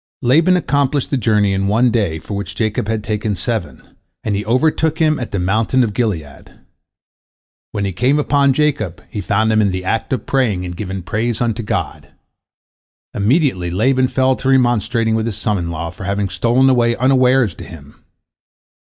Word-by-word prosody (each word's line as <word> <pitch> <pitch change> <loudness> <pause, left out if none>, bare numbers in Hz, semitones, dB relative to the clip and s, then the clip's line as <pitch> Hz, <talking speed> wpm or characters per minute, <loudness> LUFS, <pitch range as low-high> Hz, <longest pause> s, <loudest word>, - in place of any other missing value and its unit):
Laban 165 +9 +4
accomplished 140 -4 0
the - - +2
journey 105 -5 +2
in 95 0 0
one 115 +4 +3
day 100 -9 0
for 100 - -8
which 100 -2 -5
Jacob 110 -2 -1
had 110 -1 -2
taken 105 0 -2
seven, 90 - -3 0.4
and 105 - -1
he 100 - -2
overtook 155 +6 +1
him 155 -2 +2
at 120 - -4
the 100 - -3
mountain 110 +7 +1
of 110 -3 -2
Gilead. 90 - -4 1.2
When 100 -1 -2
he 95 - -1
came 125 +8 +2
upon 140 -2 +2
Jacob, 130 - -1
he 105 -5 -4
found 110 +3 +1
him 110 0 +3
in 100 - +2
the 95 0 -4
act 115 +4 -2
of 130 -5 -2
praying 110 -9 0
and 90 -1 -6
giving 95 0 -5
praise 110 +5 -2
unto 120 -1 -1
God. 105 - -4 1.1
Immediately 105 - +1
Laban 130 +8 +2
fell 130 0 +1
to 130 - -2
remonstrating 120 -3 +2
with 110 0 0
his 105 -3 -4
son 105 -2 -1
in 85 -1 -4
law 85 0 -4
for 90 +2 -9
having 100 0 -1
stolen 120 +8 +2
away 120 -3 +3
unawares 130 -4 +3
to - - -10
him. 75 -4 -13
110 Hz, 180 wpm, -17 LUFS, 100-130 Hz, 1.2 s, Laban